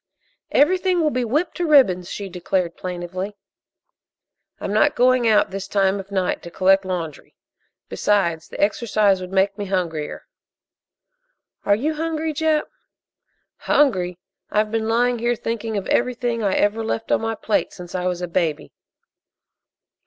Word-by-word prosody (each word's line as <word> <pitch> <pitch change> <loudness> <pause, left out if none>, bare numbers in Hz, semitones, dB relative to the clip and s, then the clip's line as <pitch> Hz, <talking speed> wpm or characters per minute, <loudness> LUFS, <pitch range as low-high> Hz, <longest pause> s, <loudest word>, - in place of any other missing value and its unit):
"Everything 365 +4 +3
will 310 -2 +2
be 250 -1 -1
whipped 300 +10 -1
to 350 -2 -1
ribbons," 190 - +4
she 200 - -5
declared 180 -1 -2
plaintively. 185 +2 -5 1.2
"I'm 200 - -3
not 290 +8 +3
going 250 -1 +3
out 215 -3 +3
this 195 0 -5
time 195 0 +1
of 195 0 -9
night 190 -2 -1
to 170 - -9
collect 190 +2 +3
laundry; 170 -5 -5 0.5
besides, 170 -6 0
the - - -9
exercise 205 -2 +2
would 180 0 -7
make 195 +2 +1
me 205 - -2
hungrier." 170 -6 -3 1.4
"Are 200 - +5
you 295 +9 -1
hungry, 320 0 -2
Jap?" 310 0 +1 0.9
"Hungry! 185 -11 +1 0.3
I've 215 0 +1
been 225 0 -1
lying 240 +1 +2
here 240 +1 +1
thinking 225 -1 -3
of 195 - -3
everything 240 -1 0
I 200 -3 +1
ever 210 +2 +1
left 225 0 -3
on - - +3
my 225 0 -2
plate 215 - -1
since 175 -1 -10
I 180 -1 -1
was 180 0 -2
a - - -2
baby!" 165 -3 -1
205 Hz, 150 wpm, -22 LUFS, 185-245 Hz, 1.4 s, Are